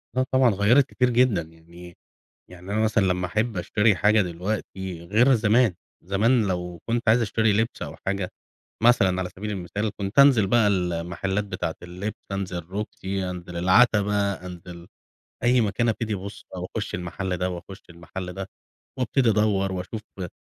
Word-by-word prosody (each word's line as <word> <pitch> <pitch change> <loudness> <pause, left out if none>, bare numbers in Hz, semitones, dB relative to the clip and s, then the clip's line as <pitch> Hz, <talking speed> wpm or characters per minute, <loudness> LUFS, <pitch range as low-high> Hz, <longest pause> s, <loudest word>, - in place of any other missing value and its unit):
آه 130 - +2
طبعًا، 130 -2 +5
غيرت 115 +8 +4
كتير 125 -1 +1
جدًا 120 -7 +3
يعني 85 +2 -14 0.5
يعني 90 +2 -10
أنا 110 +1 +1
مثلًا 110 -1 +2
لما 90 -1 0
أحب 110 +2 -1
أشتري 105 +4 +2
حاجة 105 +3 +4
دلوقتي 95 -1 -4
غير 115 +8 +4
زمان. 110 -1 +3 0.3
زمان 105 +5 +2
لو 90 -2 -4
كنت 120 +1 0
عايز 115 +2 +5
أشتري 110 -1 +2
لبس 110 +3 -1
أو 75 -3 -5
حاجة 95 -1 -2 0.5
مثلًا، 95 -6 +4
على 90 - -2
سبيل 105 +2 -5
المثال، 100 +3 -3
كنت 100 +6 -1
أنزل 130 -8 +6
بقى 115 0 +4
المحلات 90 +1 -1
بتاعة 90 -5 -4
اللبس، 90 +5 -5 0.2
أنزل 95 -2 -3
روكسي، 95 -1 -4
أنزل 90 -1 -7
العتبة، 100 +1 +3
أنزل 90 -1 -10 0.6
أي 125 0 +4
مكان، 115 +2 +1
أبتدي 110 0 -2
أبص 100 +1 -7
أو - - -4
أخش - - -3
المحل 90 +1 -4
ده 90 +1 -1
وأخش 95 +3 -8
المحل 90 +2 -7
ده، 95 0 -6 0.5
وأبتدي 125 0 +2
أدور 105 -2 +2
وأشوف 95 +4 -5 0.2
إيه 90 -2 -4
100 Hz, 160 wpm, -25 LUFS, 90-110 Hz, 0.6 s, أنزل